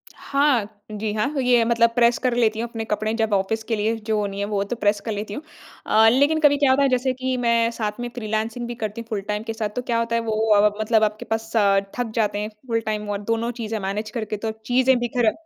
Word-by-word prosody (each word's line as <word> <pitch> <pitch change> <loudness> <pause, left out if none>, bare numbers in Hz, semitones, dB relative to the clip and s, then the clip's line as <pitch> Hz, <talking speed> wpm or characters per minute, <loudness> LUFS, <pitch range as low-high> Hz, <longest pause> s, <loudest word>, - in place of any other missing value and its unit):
हाँ, 275 -7 +1 0.2
जी 210 0 -3
हाँ, 215 +2 0
ये 245 -2 +4
मतलब 235 0 +3
प्रेस 235 0 +4
कर 250 -1 0
लेती 220 -2 +2
हूँ 235 - -2
अपने 225 -1 -5
कपड़े 215 +1 -1
जब 220 -2 0
ऑफ़िस 200 +3 0
के 225 +1 -1
लिए 220 +2 0
जो 215 -1 -1
नहीं 195 0 -6
हैं, 200 - 0
वो 205 -1 -1
तो 200 +4 -4
प्रेस 205 -2 +1
कर 225 - -2
लेती 205 0 -4
हूँ। 285 - -5 0.4
अ, 220 +1 +5
लेकिन 285 +6 +3
कभी 290 -2 +4
क्या 280 -2 +3
होता 280 +2 +3
है, 275 - +3
जैसे 255 0 +1
कि 260 0 -2
मैं 235 -1 +2
साथ 215 -1 -4
में 240 0 -3
फ्रीलांसिंग 220 +1 -3
भी 240 - -5
करती 220 0 -4
हूँ 230 - -12
फुल 210 -3 -2
टाइम 210 +1 -2
के 225 - -4
साथ। 220 -2 -3
तो 250 - -1
क्या 240 -2 -1
होता 230 0 -1
है 230 - +1
वो 215 - 0 0.2
अ, 205 +1 +5
मतलब 220 0 +2
आपके 215 0 -1
पास 225 +1 -3
अ, 200 -3 +4 0.2
थक 240 -2 -2
जाते 210 -2 0
हैं 210 +1 -3 0.2
फुल 230 -1 +1
टाइम 210 -1 -3
और 205 0 -2
दोनों 230 +1 0
चीज़ें 220 -1 -3
मैनेज 205 +3 -3
करके 215 -2 -4
तो 220 +1 -3
चीज़ें 255 +2 +3
बिखरा 240 -2 +1
225 Hz, 255 wpm, -23 LUFS, 210-240 Hz, 0.4 s, अ